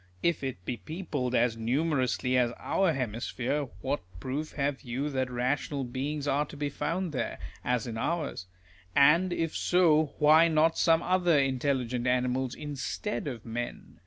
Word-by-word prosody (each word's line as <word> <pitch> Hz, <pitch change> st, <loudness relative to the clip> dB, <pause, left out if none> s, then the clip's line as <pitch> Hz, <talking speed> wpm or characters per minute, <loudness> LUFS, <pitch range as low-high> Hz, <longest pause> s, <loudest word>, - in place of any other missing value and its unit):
If 170 Hz, -4 st, +1 dB
it 125 Hz, -9 st, -5 dB
be 120 Hz, -, -2 dB
peopled 150 Hz, -7 st, -3 dB
as 120 Hz, -1 st, +3 dB
numerously 130 Hz, +1 st, 0 dB
as 120 Hz, -2 st, +2 dB
our 190 Hz, -3 st, +1 dB
hemisphere, 125 Hz, +2 st, -2 dB, 0.2 s
what -, -, -1 dB, 0.2 s
proof 140 Hz, +9 st, -4 dB
have 140 Hz, -1 st, -1 dB
you 135 Hz, +3 st, -3 dB
that 130 Hz, -1 st, -1 dB
rational 135 Hz, +3 st, -1 dB
beings 140 Hz, +4 st, -3 dB
are 145 Hz, +1 st, +2 dB
to 145 Hz, -, -10 dB
be 145 Hz, 0 st, -1 dB
found 175 Hz, +4 st, -2 dB
there, 135 Hz, -, -3 dB, 0.3 s
as 125 Hz, -2 st, 0 dB
in 115 Hz, -2 st, -4 dB
ours? 155 Hz, -, -2 dB, 0.5 s
And 165 Hz, +6 st, +5 dB
if 165 Hz, -2 st, -1 dB
so, 160 Hz, -4 st, +3 dB
why 155 Hz, +2 st, +6 dB
not 160 Hz, 0 st, +3 dB
some 165 Hz, 0 st, +3 dB
other 175 Hz, -3 st, +3 dB
intelligent 130 Hz, -2 st, 0 dB
animals 125 Hz, 0 st, 0 dB
instead 150 Hz, +6 st, -4 dB
of 120 Hz, -5 st, -6 dB
men 120 Hz, +1 st, -6 dB
140 Hz, 155 wpm, -29 LUFS, 125-155 Hz, 0.5 s, why